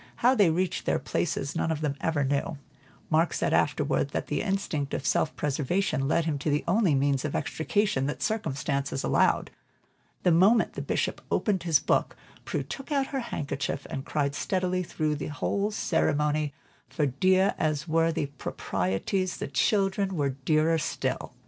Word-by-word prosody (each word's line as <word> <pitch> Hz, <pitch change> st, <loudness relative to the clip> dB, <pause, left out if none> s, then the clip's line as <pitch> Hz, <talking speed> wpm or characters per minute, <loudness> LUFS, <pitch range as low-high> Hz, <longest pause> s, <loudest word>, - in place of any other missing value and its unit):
How 250 Hz, +2 st, +4 dB
they 205 Hz, -9 st, +4 dB
reached 180 Hz, +3 st, -1 dB
their -, -, +3 dB
places 140 Hz, +3 st, -2 dB
none 165 Hz, 0 st, 0 dB
of 155 Hz, -1 st, -2 dB
them 145 Hz, -2 st, -1 dB
ever 160 Hz, -3 st, +1 dB
knew; 140 Hz, +3 st, -1 dB, 0.5 s
Mark 160 Hz, +2 st, +3 dB
said -, -, 0 dB
afterward, 145 Hz, -1 st, +1 dB
that -, -, -1 dB
the 145 Hz, -, 0 dB
instinct 190 Hz, -8 st, -1 dB
of 140 Hz, -, -4 dB
self 155 Hz, -, +1 dB
preservation 145 Hz, +1 st, 0 dB
led 160 Hz, +2 st, +2 dB
him 150 Hz, -3 st, -1 dB
to 150 Hz, -, -1 dB
the 145 Hz, 0 st, +1 dB
only 185 Hz, -4 st, +3 dB
means 135 Hz, -1 st, +1 dB
of 150 Hz, -, -3 dB
extrication 160 Hz, 0 st, 0 dB
that 145 Hz, -, -3 dB
circumstances 140 Hz, -9 st, -1 dB
allowed. -, -, +2 dB, 0.7 s
The 180 Hz, -, +4 dB
moment 195 Hz, +7 st, +4 dB
the -, -, -4 dB
Bishop -, -, -1 dB
opened 200 Hz, -4 st, +1 dB
his 165 Hz, -3 st, +4 dB
book, -, -, 0 dB, 0.3 s
Prue -, -, -2 dB
took 270 Hz, +2 st, -8 dB
out 275 Hz, -1 st, 0 dB
her 270 Hz, -, 0 dB
handkerchief 145 Hz, -, -3 dB
and 135 Hz, -, -3 dB
cried 140 Hz, -1 st, -1 dB
steadily 185 Hz, +2 st, 0 dB
through 155 Hz, -4 st, -1 dB
the -, -, -4 dB
entire 200 Hz, +7 st, -1 dB
ceremony, 150 Hz, -6 st, +1 dB, 0.4 s
for 150 Hz, -, 0 dB
dear 185 Hz, +8 st, +3 dB
as 155 Hz, 0 st, 0 dB
were 165 Hz, +1 st, +2 dB
the 155 Hz, -, -1 dB
proprieties, 140 Hz, -, -2 dB
the -, -, -4 dB
"children" 195 Hz, -, +1 dB
were 145 Hz, -4 st, +1 dB
dearer 155 Hz, +4 st, +1 dB
still. -, -, -3 dB
155 Hz, 170 wpm, -27 LUFS, 140-185 Hz, 0.7 s, How